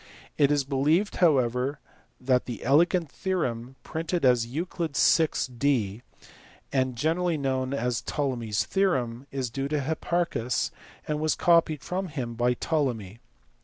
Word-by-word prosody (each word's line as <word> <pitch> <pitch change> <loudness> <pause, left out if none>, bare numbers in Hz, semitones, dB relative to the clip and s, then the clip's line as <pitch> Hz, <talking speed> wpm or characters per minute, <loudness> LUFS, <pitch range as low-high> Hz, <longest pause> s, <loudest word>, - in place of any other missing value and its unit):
It 140 -2 +4
is 145 -1 +2
believed 150 +8 +1
however 135 -3 +2 0.4
that 125 -1 +1
the 120 -3 -6
elegant 165 +3 +3
theorem, 130 -10 -2
printed 165 0 -2
as 125 -2 +4
Euc. 160 +10 -5
vi. 160 -3 +2
D 120 -7 +1 0.7
and 130 -2 +1
generally 165 +5 0
known 130 -2 -1
as 125 -3 -1
Ptolemy 130 -6 -2
s 105 - +1
Theorem, 135 -10 0
is 130 -3 -3
due 135 +3 -2
to 150 +1 -1
Hipparchus 160 -3 -1 0.4
arid 150 0 -1
was 155 0 +1
copied 165 -4 +3
from 190 +1 -3
him 130 -7 -4
by 120 +1 +1
Ptolemy. 120 - -2
140 Hz, 135 wpm, -27 LUFS, 125-160 Hz, 0.7 s, It